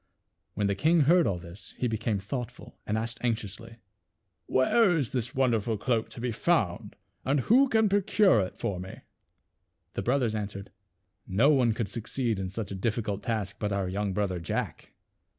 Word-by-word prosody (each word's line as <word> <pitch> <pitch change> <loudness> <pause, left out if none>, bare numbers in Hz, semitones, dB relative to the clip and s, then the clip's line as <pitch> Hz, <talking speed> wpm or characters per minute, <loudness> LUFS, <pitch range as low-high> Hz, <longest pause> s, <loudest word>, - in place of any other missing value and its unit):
When 105 - 0
the 100 - +2
king 160 - +3
heard 170 +3 +5
all 95 -3 0
this 85 +3 -11
he 125 - 0
became 110 -1 -1
thoughtful, 115 +5 -6
and 105 - 0
asked 115 +1 -4
anxiously, 115 -1 -3 0.7
"Where 175 - +4
is 135 -8 -1
this 125 -2 -3
wonderful 115 -4 +1
cloak 115 +1 0
to 115 - -10
be 125 0 -1
found 105 - 0 0.3
and 135 +1 +1
who 255 - +4
can 220 -2 +3
procure 200 - +4
it 95 -2 -3
for 95 -3 -2
me? 95 +1 -8 0.4
" - - -50
The - - -2
brothers 125 -3 +1
answered, 100 -2 -5 0.3
" - - -47
No 115 +11 +4
one 125 -6 +3
could 115 -3 -2
succeed 115 +1 -2
in 95 -1 -3
such 100 +2 -5
a - - -3
difficult 105 0 -2
task 110 -5 -3
but 105 -1 -1
our 100 -2 -1
young 100 +2 -2
brother 95 -2 -1
Jack." 85 - -4
115 Hz, 180 wpm, -28 LUFS, 100-130 Hz, 0.7 s, heard